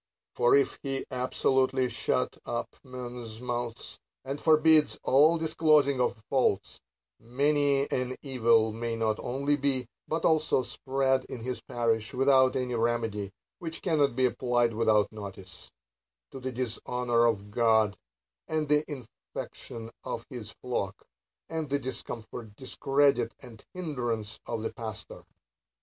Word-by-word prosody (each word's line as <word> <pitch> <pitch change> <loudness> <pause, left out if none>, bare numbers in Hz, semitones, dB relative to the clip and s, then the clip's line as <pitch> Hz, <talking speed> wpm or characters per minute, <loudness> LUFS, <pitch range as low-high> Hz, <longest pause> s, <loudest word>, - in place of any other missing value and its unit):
For 120 - +4
if 140 - +2
he 135 -1 -2
ahsolutely 130 0 +1
shut 115 - 0
up - - -4
men's 120 -3 -7
mouths, 120 -1 -4 0.3
and 140 +2 -4
forbid 155 -1 +5
all 150 +5 +5
disclosing 155 -4 +3
of 120 -3 -1
faults, 130 -7 0 0.4
many 140 +3 +2
an 130 0 -1
evil 115 -5 +3
may 115 +1 -2
not 110 -1 0
only 140 +3 0
be, 135 -3 0 0.2
but 160 +1 -1
also 155 -4 +3
spread 135 0 0
in 120 - -7
his 125 +2 -4
parish, 115 -1 -1
without 130 0 +4
any 125 -1 -1
remedy 115 -4 -1 0.3
(which 165 -1 -6
cannot 150 -8 +2
be 130 0 +3
applied 120 -2 +1
without 110 -2 +3
notice), 95 -4 -9 0.6
to 135 - -7
the 130 0 -4
dishonor 120 -1 0
of 105 -3 -1
God, 110 -2 +3 0.5
and 155 -1 -1
the 150 +1 +3
infection 115 -3 -8
of 115 - -4
his 120 -4 -6
flock, 120 -7 -3 0.4
and 160 -3 -3
the 140 - +2
discomfort, 115 -4 -7
discredit, 140 +2 +1
and 115 -4 -13
hindrance 120 -11 -3
of 115 -2 -3
the - - -3
pastor. 110 -2 -7
125 Hz, 130 wpm, -29 LUFS, 115-140 Hz, 0.6 s, forbid